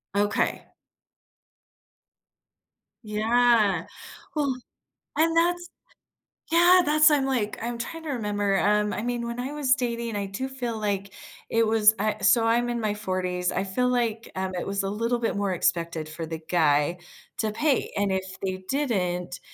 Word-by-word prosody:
Okay. 205 +1 0 2.4
Yeah, 220 -1 +2 0.5
well 280 -4 0 0.6
and 330 +1 +2
that's 350 +1 +2 0.8
yeah, 355 +2 +6
that's 305 +1 +6
I'm, 285 -2 +3
like, 245 -6 -1
I'm 235 0 -3
trying 325 +7 -6
to 310 - -5
remember, 205 -5 0
um 210 0 +2
I - - -3
mean, 240 -1 -2
when 235 +1 -4
I 265 +3 -4
was 280 -3 +2
dating, 235 -3 -3
I 200 -1 -2
do 205 +7 -4
feel, 245 -4 -4
like, 200 -2 -2 0.4
it 230 -1 +2
was 220 0 +5
a 215 -1 -1
so, 220 +3 +5
I'm 240 +1 +2
in 240 0 -1
my 210 -1 0
40s. 185 -3 -2
I 190 - -1
feel, 250 +6 0
like, 235 -2 -1
um, 190 0 -2
it 180 - -3
was 195 0 -1
a 195 - -2
little 230 +3 -1
bit 230 -3 -1
more 200 -2 0
expected 165 -2 0
for 160 +1 -6
the 160 0 -6
guy 155 0 +2 0.4
to 215 -1 0
pay 280 +4 0
and 200 -1 +1
if 190 0 -4
they 185 0 -3
didn't, 185 -11 -1
215 Hz, 160 wpm, -26 LUFS, 195-245 Hz, 2.4 s, yeah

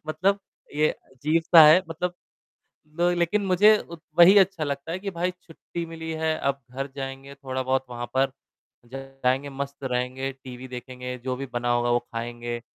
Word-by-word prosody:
मतलब 185 +6 +1 0.4
ये 155 +1 +3
अजीब-सा 160 +5 +3
है 165 +5 +7
मतलब 175 +2 -3 0.8
लो 175 0 +3
लेकिन 175 +4 +1
मुझे 205 +4 +6
उत 170 -4 -10 0.2
वही 180 +4 +9
अच्छा 190 -4 +2
लगता 140 +3 -4
है 180 - -2
कि 195 +1 -4
भाई 180 0 -1
छुट्टी 170 0 -7
मिली 160 0 -7
है, 160 0 0
अब 140 0 -1
घर 135 +2 -4
जाएँगे 135 0 -6
थोड़ा-बहुत 130 -1 -2
वहाँ 120 0 -5
पर 135 0 +2 0.6
जाएँगे 135 0 -2
मस्त 140 0 -6
रहेंगे, 130 +1 -2
टीवी 130 -1 -10
देखेंगे, 125 0 -7
जो 125 +1 -3
भी 135 +1 -5
बना 120 0 -1
होगा 120 0 +1
वो 120 - +4
खाएँगे। 120 0 -5
135 Hz, 165 wpm, -25 LUFS, 130-165 Hz, 0.8 s, वही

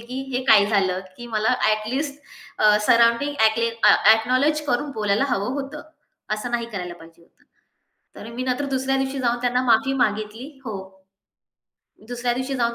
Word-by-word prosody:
की 250 +3 -6
हे 255 +1 -1
काय 210 -6 +6
झालं 190 -3 +1 0.2
की 240 - -9
मला 220 +2 +1
at 215 0 0
least 285 +1 -3 0.4
a, 210 0 +5
surrounding 235 +5 +3
ॲकले 220 +1 +3 0.2
acknowledge 255 +8 +3
करून 270 +3 -1
बोलायला 210 +3 +1
हवं 205 -1 -1
होतं. 290 +2 -9 0.5
असं 215 +3 -6
नाही 235 -1 -1
करायला 180 -2 -5
पाहिजे 165 0 -17
होतं. - - -29 0.7
तर 220 - -9
मी 250 - -4
नंतर 255 +2 -1
दुसऱ्या 265 +1 0
दिवशी 270 +1 -2
जाऊन 240 -1 0
त्यांना 250 0 +1
माफी 240 +2 +3
मागितली 215 +3 -3 0.2
हो. 220 -5 -5 1.3
दुसऱ्या 245 0 -2
दिवशी 260 +2 -3
जाऊन 235 -2 0
235 Hz, 160 wpm, -22 LUFS, 215-260 Hz, 1.3 s, काय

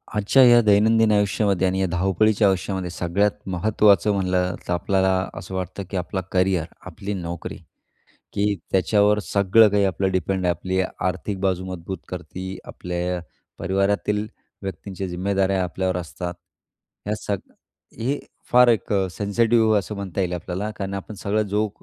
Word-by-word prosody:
आजच्या 105 +6 +4
या 120 -1 +8
दैनंदिन 110 +1 +4
आयुष्यामध्ये 100 -2 +2
आणि 95 +1 0
या - - +2
धावपळीच्या 95 +4 +2
आयुष्यामध्ये, 95 -1 -1
सगळ्यात 90 +4 +1 0.2
महत्त्वाचं 100 +1 +3
म्हटलं 90 -2 0
तर, 90 - 0
आपल्याला 95 +2 +1 0.3
असं 95 0 -8
वाटतं, 95 +2 -4
की 95 - -3
आपलं 90 +2 -2
करिअर, 90 -3 +2 0.2
आपली 100 +3 -5
नोकरी 85 -3 -5 0.8
की 100 0 +1 0.2
त्याच्यावर 105 +2 +3
सगळं 100 +3 +5
काही 100 0 +2
आपलं 95 0 0
डिपेंड 95 +1 -1
आहे. 90 - +3
आपली 95 +3 -2
आर्थिक 95 +2 -3
बाजू 95 -1 0
मजबूत 95 0 -5
करते 95 +1 -6
आपल्या 90 0 -3 0.4
परिवारातील 100 +3 0 0.3
व्यक्तींच्या 95 +1 -5
जिम्मेदाऱ्या 95 +1 0
आपल्यावर 90 +1 -1
असतात. 90 +1 -5 0.7
ह्या 105 +1 -1
सग 100 -2 -2 0.6
हे 135 +5 -1 0.3
फार 125 0 +7
एक 115 -4 +2
अ, 95 -2 +2
सेन्सिटिव्ह 110 +3 +2
आहे 105 - +4
असं 100 +2 -6
म्हणता 100 -2 -3
येईल 90 -1 -1
आपल्याला, 90 +4 -4
कारण 100 -1 -4
आपण 100 +2 -6
सगळं 100 +2 0
जो 105 +2 +1
95 Hz, 150 wpm, -23 LUFS, 90-105 Hz, 0.8 s, या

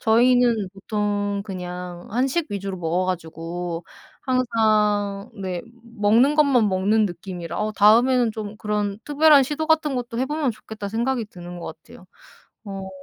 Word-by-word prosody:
저희는 235 -2 +3
보통 205 0 -2
그냥 180 -2 -7
한식 270 +8 0
위주로 195 -1 -4
먹어 175 +1 -1
가지고 170 -1 -4 0.4
항상 215 -5 +1
네 185 -4 -4
음 230 - -19 0.3
먹는 230 +8 +4
것만 275 -8 +4
먹는 200 +3 +2
느낌이라 175 -1 -6
어 215 0 -1
'다음에는 235 +3 +4
좀 215 -1 -6
그런 210 -2 -2
특별한 295 -1 +6
시도 300 +4 -2
같은 315 -3 +2
것도 240 -1 -4
해 260 - +1
보면 300 -3 0
좋겠다.' 215 -1 -8
생각이 235 +2 -1
드는 175 -2 -10
것 - - -7
같아요. - - -16 0.6
어. 195 -2 -6
210 Hz, 295 characters per minute, -23 LUFS, 190-245 Hz, 0.6 s, 특별한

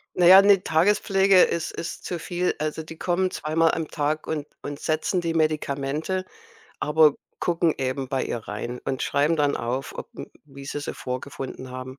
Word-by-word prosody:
Naja, 180 +2 +8
'ne 200 -2 +5
Tagespflege 195 +2 +4
ist 170 - -1
ist 170 - -6
zu 175 -2 -4
viel. 180 +2 -1
Also, 155 +1 -3
die 160 +1 -11
kommen 185 +1 0
zweimal 160 +1 +1
am 165 -1 -2
Tag 150 +1 -2
und 150 -2 -3
und 145 0 -6
setzen 160 +3 0
die 165 -1 -2
Medikamente, 155 +3 -1 0.6
aber 150 -1 +4 0.3
gucken 170 -2 +1
eben 130 0 -2
bei 135 -1 -1
ihr - - -3
rein 115 +3 -6
und 130 -1 -2
schreiben 145 +4 +2
dann 145 -1 +1
auf, 125 +3 -3
ob - - -7
m - - -7 0.2
wie 140 -1 -12
sie 145 +1 -4
sie - - -5
vorgefunden 130 0 -6
haben. 130 +1 -8
155 Hz, 175 wpm, -24 LUFS, 135-170 Hz, 0.6 s, Naja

